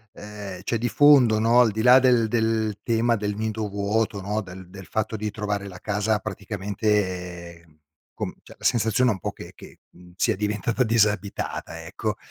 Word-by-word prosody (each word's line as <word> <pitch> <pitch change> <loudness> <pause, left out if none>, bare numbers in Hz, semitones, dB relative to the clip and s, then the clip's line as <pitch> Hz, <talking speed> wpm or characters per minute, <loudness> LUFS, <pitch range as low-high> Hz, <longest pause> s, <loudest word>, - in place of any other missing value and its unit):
ehm, 105 -3 -9
c'è 115 - -1
di 120 - -1
fondo 130 -3 +5
no, 115 +3 +4
al 120 - +5
di 110 +1 -2
là 125 +2 +7
del 125 -3 +4
del 110 -2 0
tema 115 0 +1
del 105 0 -3
nido 110 -1 -3
vuoto 100 +1 -1
no, 105 +3 -2
del 95 -2 -10
del 95 -1 -11
fatto 110 0 -2
di 105 0 -3
trovare 105 -1 -3
la 90 -1 -10
casa 105 +1 0
praticamente 95 -4 -3 0.5
com - - -5
cioè - - -15
la - - -15
sensazione 120 +2 +2
è - - +3
un 95 - -10
po' - - -3
che - - -11
che, - - -14
mhmm, 90 0 -17
sia - - +1
diventata 105 +4 -1
disabitata, 105 -7 -1
ecco. - - -4
105 Hz, 180 wpm, -24 LUFS, 100-110 Hz, 0.5 s, là